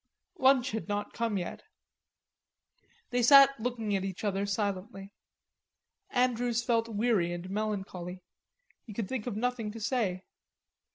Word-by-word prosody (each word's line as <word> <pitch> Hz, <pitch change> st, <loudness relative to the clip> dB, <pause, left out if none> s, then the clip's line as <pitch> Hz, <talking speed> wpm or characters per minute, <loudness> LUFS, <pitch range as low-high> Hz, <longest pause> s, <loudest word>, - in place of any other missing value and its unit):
Lunch 265 Hz, -1 st, +4 dB
had 220 Hz, 0 st, -4 dB
not 205 Hz, 0 st, -3 dB
come 230 Hz, -3 st, -1 dB
yet. 175 Hz, -, -5 dB, 1.5 s
They 245 Hz, 0 st, +1 dB
sat 275 Hz, +2 st, +8 dB
looking 225 Hz, -3 st, -2 dB
at 190 Hz, -, -1 dB
each 190 Hz, 0 st, -5 dB
other 200 Hz, -1 st, 0 dB
silently. 200 Hz, 0 st, -3 dB, 1.0 s
Andrews 245 Hz, -2 st, +1 dB
felt 230 Hz, -2 st, +1 dB
weary 210 Hz, -5 st, +1 dB
and 175 Hz, +1 st, -5 dB
melancholy. 190 Hz, -4 st, -4 dB, 0.6 s
He 215 Hz, -, -10 dB
could 205 Hz, -1 st, -3 dB
think 255 Hz, -1 st, -4 dB
of 235 Hz, -, -3 dB
nothing 245 Hz, -2 st, -1 dB
to 225 Hz, -, -8 dB
say. 210 Hz, -6 st, -1 dB
215 Hz, 130 wpm, -30 LUFS, 195-240 Hz, 1.5 s, sat